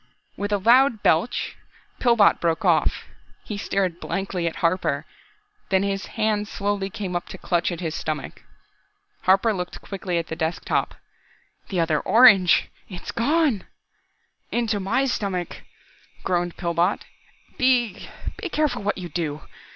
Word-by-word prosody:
With 205 +1 -3
a 205 - +3
loud 235 +2 +4
belch, 165 +9 +1 0.4
Pillbot 235 -4 +4
broke 165 -1 0
off. - - +2 0.4
He 210 - -5
stared 190 -3 -1
blankly 190 -3 -2
at 165 - -3
Harper, 165 -5 0 0.6
then 190 0 +3
his 195 0 -2
hands 215 -1 0
slowly 200 -1 -2
came 195 -3 -5
up 175 - -2
to - - -8
clutch 175 0 0
at 175 0 -5
his 160 -3 -2
stomach. 155 -1 -4 0.8
Harper 195 +4 +4
looked 180 -2 -5
quickly 185 -3 -3
at 165 - -1
the 160 - -5
desk 160 0 -2
top. - - 0 0.7
"The 185 - -1
other 160 -2 +2
orange," 210 - +6 0.2
he 185 - -10
gasped. 175 - -9
"It's - - -5
gone!" 275 - +1 0.9
"Into 230 -3 0
my 200 +8 +1
stomach!" 195 -8 -2 0.7
groaned 175 -1 -1
Pillbot. 170 +1 0 0.6
"Be 245 -6 +1 0.3
be 380 - -5
careful 305 -7 0
what 205 +1 -1
you 180 -2 -5
do! 155 -2 -3
195 Hz, 145 wpm, -24 LUFS, 175-215 Hz, 0.9 s, orange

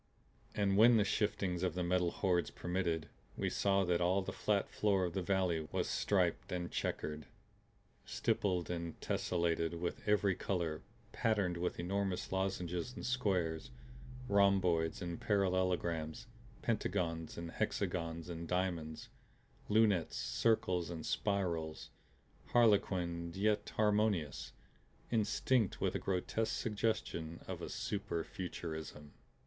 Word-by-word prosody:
And 100 -1 +2
when 115 +2 +8
the 105 - +5
shiftings 95 -3 0
of 90 -3 0
the 90 - 0
Metal 90 0 +2
Hordes 90 -1 +1
permitted 85 -3 -1 0.3
we - - 0
saw 100 -1 +2
that 90 -1 +1
all 95 +2 +3
the - - -5
flat 100 -2 +1
floor 100 -3 +2
of 85 - -3
the 95 - -1
valley 90 -4 +1
was - - 0
stripped - - +1
and 90 -1 -3
checkered, 75 -2 -3 0.8
stippled 90 -4 0
and 85 -1 -4
tessellated 85 -1 0
with 85 0 -3
every 105 -2 +4
color, 85 -4 -2 0.3
patterned 105 -6 +1
with 90 +1 -2
enormous 95 +1 -1
lozenges 95 +2 -2
and - - -6
squares, 95 -11 0 0.6
rhomboids 95 -5 +3
and 85 -1 -4
parallelograms, 90 -5 0 0.4
pentagons 85 -7 -1
and 85 0 -5
hexagons 85 -1 -2
and 85 -1 -5
diamonds, 85 -4 -2 0.6
lunettes, 105 -6 +3
circles 90 -7 +1
and 80 -2 -5
spirals; 85 -6 -1 0.6
harlequined 90 -7 +3
yet 105 +2 +1
harmonious; 105 -7 +1 0.6
instinct 115 0 +2
with - - +1
a - - -1
grotesque 95 +4 -1
suggestion 105 -7 -1
of - - -5
a - - -5
super 100 -5 -2
Futurism. 80 -5 -6
90 Hz, 120 wpm, -35 LUFS, 85-100 Hz, 0.8 s, when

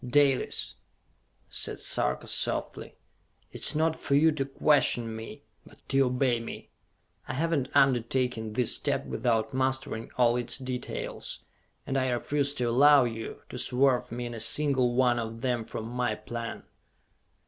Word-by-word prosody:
"Dalis," 135 +1 +2 0.7
said - - 0
Sarka 60 +1 -1
softly, - - -1 0.6
"it - - -9
is - - +4
not 160 +1 +2
for 140 - -1
you 160 +3 +5
to 145 -3 -2
question 135 -5 +2
me, 110 0 -9 0.2
but - - -18
to 135 - +2
obey 125 -1 +1
me! 115 - -9 0.6
I - - -4
have 165 +5 -1
not 140 -6 0
undertaken 125 -4 +1
this 120 +1 +1
step - - -1
without 110 -2 -1
mastering 130 -3 -2
all 120 -1 +3
its 120 - 0
details, 130 -2 -5 0.4
and 135 - -1
I 130 0 0
refuse 140 +3 -1
to 125 - -1
allow 135 +4 +6
you 115 -2 -5
to 125 - -6
swerve 130 -1 +1
me 120 +1 -4
in 120 - -6
a 115 - -6
single 130 0 +2
one 125 -2 +3
of 115 0 -5
them 125 -2 -1
from 110 0 -6
my 120 -2 -1
plan." 115 +1 -6
125 Hz, 155 wpm, -28 LUFS, 115-135 Hz, 0.7 s, allow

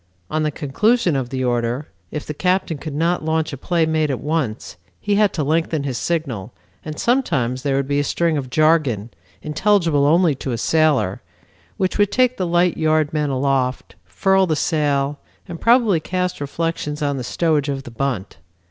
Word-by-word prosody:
On 155 - 0
the 155 - +1
conclusion 170 - +1
of 130 -3 -2
the 130 0 -2
order, 120 +3 -1 0.2
if 150 - -5
the 150 - -4
captain 180 -1 0
could 150 -1 -6
not 165 +2 0
launch 160 -1 -1
a - - -2
play 165 +4 0
made 155 -1 +1
at 135 - -2
once, 145 -6 -3 0.2
he 205 - -1
had 205 0 +3
to 155 - -1
lengthen 160 0 0
his 130 -4 -3
signal, 140 - -3 0.3
and 155 -1 -6
sometimes 145 - 0
there 140 -1 0
would 135 0 0
be 145 0 +1
a - - +1
string 165 +3 0
of 135 -3 -3
jargon, 140 -7 +2 0.3
intelligible 165 -3 +2
only 165 +1 +4
to 135 -1 -4
a - - -2
sailor, 150 - +1 0.6
which 185 +2 -1
would 205 -1 +3
take 255 +3 +2
the 185 - -1
light 175 +1 +2
yard 155 -1 +1
men 150 -2 0
aloft, 130 -1 -1
furl 190 -1 +2
the 160 - +1
sail, 145 -2 0 0.3
and 170 - -8
probably 230 -7 +4
cast 180 +1 -2
reflections 150 0 -3
on 140 -1 0
the 130 - -4
stowage 150 +2 0
of 135 -1 -3
the 120 - -10
bunt. 110 - -3
150 Hz, 185 wpm, -20 LUFS, 135-170 Hz, 0.6 s, only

